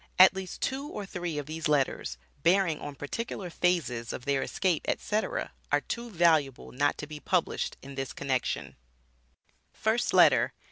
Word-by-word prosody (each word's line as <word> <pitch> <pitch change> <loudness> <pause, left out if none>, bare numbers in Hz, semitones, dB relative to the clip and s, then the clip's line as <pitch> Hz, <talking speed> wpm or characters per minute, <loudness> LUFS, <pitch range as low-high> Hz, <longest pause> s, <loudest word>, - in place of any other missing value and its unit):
At 185 +1 +9
least 190 -1 -6
two 275 +2 -1
or 210 -8 -5
three 175 -5 -4
of 145 - -3
these 155 +2 -3
letters, 135 - 0 0.2
bearing 170 -1 +3
on 145 -1 -7
particular 180 +5 -5
phases 135 -11 0
of 125 - -6
their 140 -1 +1
escape, 180 -5 0
etc., 220 - -1 0.2
are - - +3
too 235 0 -5
valuable 160 - +2
not 145 +3 +1
to - - -5
be 150 0 -8
published 180 +2 0
in 140 +1 -9
this 135 -1 -4
connection: 130 -3 -2 1.0
FIRST 225 +2 +1
LETTER. - - +5
165 Hz, 155 wpm, -29 LUFS, 140-190 Hz, 1.0 s, At